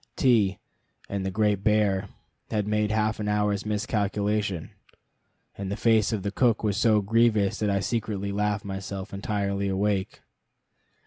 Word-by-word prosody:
T 110 -7 +3 0.5
and 100 -1 -2
the 95 - -1
Great 105 0 +1
Bear 105 -2 +2 0.4
had 105 -2 -1
made 105 0 +1
half 110 0 0
an 105 - -2
hour's 105 0 0
miscalculation, 105 -3 -1 0.8
and 100 -1 -5
the 100 - -2
face 110 -2 +3
of 105 -4 -2
the 100 - -2
cook 115 0 +2
was 105 -3 +1
so 110 0 +3
grievous 110 -1 +2
that 105 - 0
I 100 -1 +1
secretly 105 -2 -2
laughed 105 0 -1
myself 95 0 -6
entirely 100 0 -1
awake. 100 0 -1
105 Hz, 145 wpm, -26 LUFS, 100-105 Hz, 0.8 s, T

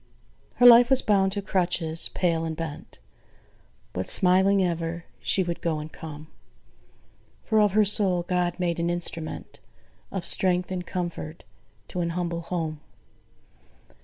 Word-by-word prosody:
Her 245 - +3
life 240 0 +8
was 265 -1 +3
bound 195 -3 +2
to 200 -1 -4
crutches: 175 -4 0
pale 170 -3 -1
and 160 -1 -4
bent, 165 -3 -7 1.0
But 95 +1 -3
smiling 190 +1 +4
ever, 170 0 -4
she 190 - +1
would 170 -1 -5
go 165 -2 -1
and 150 +1 -8
come: 155 -2 -9 1.2
For 220 -2 +1
of 210 -2 +3
her 215 0 +4
soul 190 -3 +1
GOD 175 0 -2
made 170 -2 -1
an 170 0 -1
instrument 170 -2 -4 0.5
Of 190 -3 -4
strength 180 -1 +3
and 180 -1 -5
comfort 170 -3 -5 0.5
to 180 - -3
an 170 - -1
humble 170 -1 -3
home. 165 -3 -4
175 Hz, 140 wpm, -25 LUFS, 165-190 Hz, 1.2 s, life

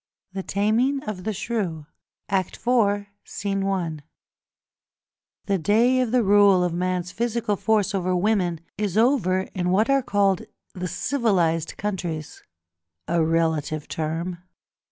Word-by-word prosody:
The 195 - -3
Taming 225 +9 +1
of 200 -4 -6
the 220 - 0
Shrew, 190 -8 -3 0.5
IV. 190 -2 0
i. 200 -5 -1 1.5
The 200 -1 +1
day 230 +9 +3
of 250 -3 0
the 250 -1 +3
rule 200 -2 +5
of 175 -1 0
man's 180 0 -1
physical 235 -2 -1
force 210 -1 +1
over 185 -1 0
women 180 -4 +1 0.2
is 210 -2 -1
over 220 -6 +3
in 180 -1 -1
what 215 +7 +3
are 275 0 +4
called 200 -5 +1 0.3
the 180 0 -4
civilised 180 - 0
countries—a 150 - -5
relative 160 -2 0
term! 165 +3 -3
190 Hz, 115 wpm, -24 LUFS, 170-215 Hz, 1.5 s, rule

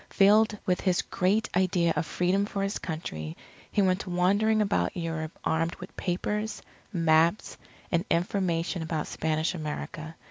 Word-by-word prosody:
Filled 210 +2 +4
with 180 -1 +1
his 185 -2 +2
great 200 +4 +1
idea 180 -2 +2
of 165 - -1
Freedom 190 +3 +1
for 200 -2 -2
his 195 +1 -2
Country, 80 - -5 0.3
he 205 - +3
went 185 +1 +1
wandering 200 +5 +2
about 205 -2 +1
Europe 165 -2 -4
armed 165 +1 0
with - - -11
papers, 210 +4 -2 0.3
maps, 165 +1 +2 0.4
and 170 0 +2
information 175 -1 0
about 160 -1 -2
Spanish 155 0 -1
America. 155 0 -5
180 Hz, 140 wpm, -28 LUFS, 165-195 Hz, 0.4 s, Filled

